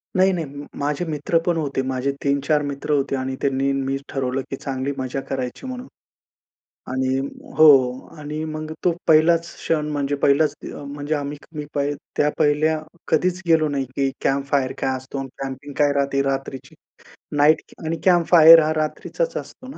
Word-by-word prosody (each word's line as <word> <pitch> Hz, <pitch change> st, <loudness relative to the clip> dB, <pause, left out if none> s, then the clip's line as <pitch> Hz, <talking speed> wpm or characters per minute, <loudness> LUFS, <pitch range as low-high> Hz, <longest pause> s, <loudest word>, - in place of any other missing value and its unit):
नाही-नाही. 185 Hz, -3 st, +2 dB, 0.3 s
माझे 145 Hz, +4 st, -1 dB
मित्रपण 165 Hz, +2 st, 0 dB
होते. 140 Hz, -4 st, -1 dB
माझे 130 Hz, +1 st, -1 dB
3-4 140 Hz, +2 st, +1 dB
मित्र 140 Hz, +1 st, -4 dB
होते 140 Hz, -1 st, +1 dB
आणि 130 Hz, 0 st, -3 dB
त्यांनी, 135 Hz, 0 st, +1 dB
मी 135 Hz, 0 st, -1 dB
ठरवलं 135 Hz, 0 st, -2 dB
की -, -, -3 dB
चांगली 135 Hz, 0 st, -3 dB
मजा 130 Hz, +1 st, -3 dB
करायची 130 Hz, -, -4 dB
म्हणून. 255 Hz, 0 st, -6 dB, 1.0 s
आणि 130 Hz, 0 st, 0 dB, 0.4 s
हो. 155 Hz, -, +8 dB, 0.5 s
आणि 150 Hz, +1 st, -5 dB
मग 155 Hz, 0 st, -5 dB
तो 175 Hz, -, +3 dB
पहिलाच 165 Hz, +2 st, +5 dB
क्षण 155 Hz, -2 st, -1 dB
म्हणजे 145 Hz, -1 st, -1 dB
पहिलाच 145 Hz, +2 st, +4 dB, 0.2 s
अ, -, -, -8 dB
म्हणजे 145 Hz, +2 st, -3 dB
आम्ही 145 Hz, 0 st, -4 dB, 0.2 s
मी 150 Hz, -1 st, -4 dB, 0.5 s
त्या 150 Hz, -, +3 dB
पहिल्या 155 Hz, +1 st, +2 dB, 0.3 s
कधीच 180 Hz, +3 st, +1 dB
गेलो 160 Hz, -2 st, +4 dB
नाही 140 Hz, -2 st, -1 dB
की 135 Hz, -1 st, +1 dB
कॅम्प 135 Hz, 0 st, +1 dB
फायर 135 Hz, -2 st, +2 dB
काय 130 Hz, 0 st, 0 dB
असतो 130 Hz, +2 st, -8 dB
आणि 135 Hz, -, -4 dB
कॅम्पिंग 135 Hz, +1 st, -6 dB
काय 145 Hz, -1 st, +4 dB
राहते 140 Hz, -1 st, +1 dB
रात्रीची, 135 Hz, -1 st, -4 dB, 0.6 s
नाईट 155 Hz, +2 st, +5 dB, 0.2 s
आणि 165 Hz, +1 st, -1 dB
कॅम्प 175 Hz, -3 st, +4 dB
फायर 165 Hz, -1 st, +10 dB
हा 155 Hz, -, 0 dB
रात्रीचाच 160 Hz, -, -2 dB
असतो 255 Hz, -, -9 dB
ना? 270 Hz, -, -9 dB
145 Hz, 160 wpm, -22 LUFS, 135-155 Hz, 1.0 s, फायर